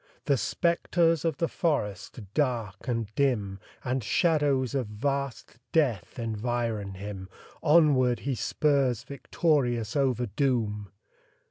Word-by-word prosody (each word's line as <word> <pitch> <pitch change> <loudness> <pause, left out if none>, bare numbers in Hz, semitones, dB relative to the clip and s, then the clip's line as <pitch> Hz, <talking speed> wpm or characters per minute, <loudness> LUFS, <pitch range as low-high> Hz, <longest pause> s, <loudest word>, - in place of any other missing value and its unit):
The 140 - +3
spectres 165 - +1
of 165 -4 0
the 165 - +1
forest, 115 - -2
dark 120 -9 -1
and 115 -4 -2
dim, 105 -8 0 0.2
And 130 0 -1
shadows 145 - +2
of 130 -5 -1
vast 135 +3 -3
death 130 - +1
environ 115 -3 -2
him 95 -1 -7 0.3
Onward 145 -6 +4
he 140 - -1
spurs 130 0 +1
victorious 130 -5 0
over 130 -4 +1
doom. 105 -3 -1
125 Hz, 110 wpm, -28 LUFS, 110-145 Hz, 0.3 s, Onward